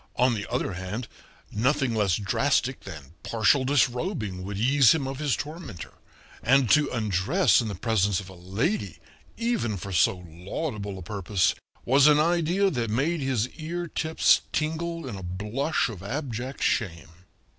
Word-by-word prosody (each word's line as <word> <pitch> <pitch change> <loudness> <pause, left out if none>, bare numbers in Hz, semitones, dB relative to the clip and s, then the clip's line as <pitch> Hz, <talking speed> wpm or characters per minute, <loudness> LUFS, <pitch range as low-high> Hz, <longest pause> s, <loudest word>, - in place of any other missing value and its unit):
On 125 0 +3
the 105 -3 -4
other 100 - -1
hand, 95 +6 -5 0.4
nothing 130 +3 +1
less 105 -5 +2
drastic 130 +6 0
than 80 -6 -10
partial 115 +4 +2
disrobing 125 - 0
would 100 +1 -5
ease 130 +4 +5
him 140 -4 -2
of 135 0 -5
his 145 -6 +1
tormentor, 150 - -7 0.5
and 130 0 +3
to 150 -2 +4
undress 110 - +2
in 115 - -3
the 105 - -4
presence 100 -5 +1
of 95 - -9
a 95 - -11
lady, 100 - -2 0.4
even 230 - -1
for 100 +2 -7
so 90 +1 +2
laudable 100 - -5
a 95 - -8
purpose, 100 0 0 0.3
was 135 +3 +5
an 150 0 +6
idea 175 +4 +2
that 120 -5 -2
made 145 +9 0
his 130 -4 0
ear 170 +2 -5
tips 160 0 +2
tingle 165 +1 -2
in 115 - -5
a 95 - -7
blush 105 - -1
of 105 -7 -8
abject 125 +3 -4
shame. 85 -9 -1
120 Hz, 155 wpm, -26 LUFS, 100-150 Hz, 0.5 s, an